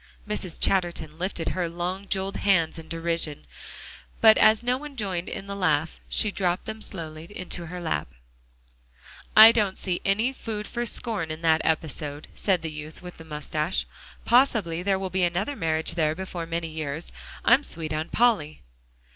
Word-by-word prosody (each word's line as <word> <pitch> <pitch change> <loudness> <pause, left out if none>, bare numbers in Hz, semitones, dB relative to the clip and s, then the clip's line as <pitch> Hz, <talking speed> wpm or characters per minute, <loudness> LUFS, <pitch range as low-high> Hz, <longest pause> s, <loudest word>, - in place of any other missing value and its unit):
Mrs. 200 -5 -4
Chatterton 175 -4 0
lifted 180 -2 -2
her 180 -2 -1
long 180 +4 -4
jeweled 195 0 -1
hands 170 -5 +2
in 160 - -11
derision, 165 - -2 0.7
but 220 -1 +8
as 215 +2 +5
no 245 +1 +2
one 290 +1 -8
joined 190 -6 -2
in 195 - -6
the 200 0 -5
laugh, 160 -4 0
she 215 - +3
dropped 180 -2 -1
them 220 0 -6
slowly 160 -5 -6
into 175 -2 -6
her 180 +2 -6
lap. 165 -2 -2 1.3
"I 220 +1 +12
don't 205 -4 +1
see 180 -2 -2
any 220 +7 +2
food 215 -5 -5
for 240 +1 -3
scorn 215 -9 -1
in 155 +1 -6
that 160 -1 +4
episode," 150 -2 -2
said 185 -4 0
the 160 - -3
youth 155 +3 -8
with 180 0 -9
the 160 - -10
moustache. 150 +2 -2 0.4
"Possibly 225 -9 +3
there 195 +1 +1
will 190 -1 -4
be 185 +1 0
another 175 +11 0
marriage 160 -5 0
there 155 -2 +1
before 180 -2 -5
many 165 0 -2
years. 155 0 -4 0.3
I'm 245 +4 +6
sweet 160 - -2
on 155 +2 -2
Polly." 205 - +2
175 Hz, 170 wpm, -26 LUFS, 160-200 Hz, 1.3 s, I